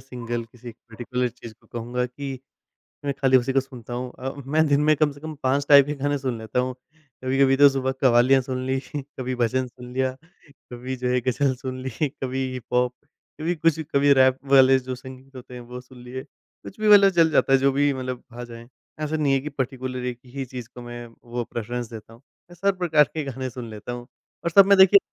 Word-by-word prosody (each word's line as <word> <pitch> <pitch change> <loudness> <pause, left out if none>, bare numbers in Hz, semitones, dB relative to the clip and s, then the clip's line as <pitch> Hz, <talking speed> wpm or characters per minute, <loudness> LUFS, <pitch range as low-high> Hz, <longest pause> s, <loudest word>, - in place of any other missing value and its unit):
Single 120 -2 -5
किसी 120 +1 -12
particular 120 +2 -4
चीज़ 115 -1 -12
को - - -26
कहूँगा 120 +1 -3
कि 135 +1 -7 0.7
मैं 140 - 0
खाली 130 -1 +5
उसी 130 +1 -1
को 135 - +4
सुनता 125 -3 -9
हूँ। 125 +1 -4
अ, 130 +1 -3
मैं 155 +3 +2
दिन 145 0 +3
में 155 - +6
कम 150 0 +2
से 140 - -13
कम 155 0 -6
5 135 +2 +1
टाइप 140 -2 +9
के 145 - -3
गाने 145 +1 +1
सुन 130 -4 -3
लेता 110 +2 -3
हूँ। 125 0 -1 0.5
कभी-कभी 135 +1 +3
तो 145 0 +8
सुबह 135 -1 -1
कव्वालियाँ 130 +1 +5
सुन 130 0 -4
ली, 130 0 0 0.4
कभी 130 0 -2
भजन 125 +2 0
सुन 125 0 -12
लिया, 130 0 0 0.6
कभी 125 +2 -5
जो 125 0 -2
है 125 0 +1
गज़ल 130 +2 +1
सुन 130 -1 -5
ली, 130 - -3 0.2
कभी 130 -1 -3
हिप-हॉप, 125 0 -1 0.5
कभी 165 +3 -1
कुछ 165 0 +2
कभी 140 0 +5
रैप 130 0 +4
वाले 135 -1 +7
जो 130 0 -5
संगीत 130 +1 -13
होते 125 0 -11
हैं 125 - -8
वो 125 +1 -9
सुन 125 0 -15
लिए। 130 +1 -7
कुछ 195 - -16
भी 215 - 0
मतलब 200 -1 +8
चल 165 -3 +4
जाता 135 - +3
है, 135 - +6
जो 135 +1 +3
भी 145 +1 +2
मतलब 130 -1 -5
आ 120 +1 -7
जाएँ। 115 -1 -11 0.3
ऐसा 155 0 -2
नहीं 150 -3 +1
है 135 - +3
कि 145 +3 -6
पर्टिकुलर 130 -2 -4
एक 125 -1 -4 0.2
ही 135 -1 -3
चीज़ 125 -2 -8
को 125 - -9
मैं 120 0 -8 0.3
वो 120 - 0
प्रेफ्ररेंस 120 +1 -4
देता 110 0 -10
हूँ। 115 - -17 0.3
मैं 175 - -13
सब 195 +2 0
प्रकार 160 -4 +4
के 155 - -2
गाने 130 -1 -4
सुन 125 -1 -8
लेता 110 +2 -7
हूँ। 120 0 -7 0.4
और 170 - 0
सब 195 +3 +7
में 200 0 +5
देखिए 190 +1 +8
130 Hz, 225 wpm, -24 LUFS, 125-140 Hz, 0.7 s, टाइप